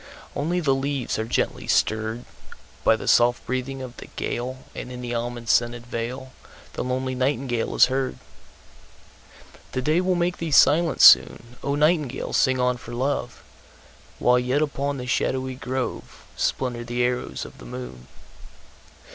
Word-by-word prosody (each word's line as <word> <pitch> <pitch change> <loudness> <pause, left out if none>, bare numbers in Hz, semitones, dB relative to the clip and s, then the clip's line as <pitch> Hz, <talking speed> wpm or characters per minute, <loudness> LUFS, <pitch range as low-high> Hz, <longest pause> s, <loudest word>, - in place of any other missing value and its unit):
Only 170 +5 0
the 145 -6 +2
leaves 135 -3 -2
are 110 - -1
gently 115 - -1
stirredBy 110 +2 +1 0.7
the - - -8
soft 120 0 +4
breathing 130 +1 -3
of 125 -1 -9
the - - -10
gale, 130 +2 -4
And 125 - -7
in 125 0 -7
the 120 -1 -4
almond 120 0 -4
scented 120 0 +1
valeThe 125 +3 -4 0.5
lonely 130 +1 -2
nightingale 130 -2 -1
is - - +7
heard. 130 0 -2 1.6
The 130 - -1
day 155 +5 +2
will 185 0 +1
make 175 0 0
thee 165 - -3
silent 160 +3 +4
soon,O 125 +4 +5
nightingale 150 -3 +1
sing 130 -2 +3
on 125 0 +1
for 120 0 -9
love! 130 -1 -2 0.7
While 125 0 +4
yet 130 +4 +1
upon 140 -1 -2
the 125 - -5
shadowy 130 +1 -1
groveSplinter 125 -1 -3
the 120 +1 0
arrows 125 0 -2
of - - -13
the - - -11
moon. 60 0 -8
130 Hz, 140 wpm, -24 LUFS, 120-140 Hz, 1.6 s, is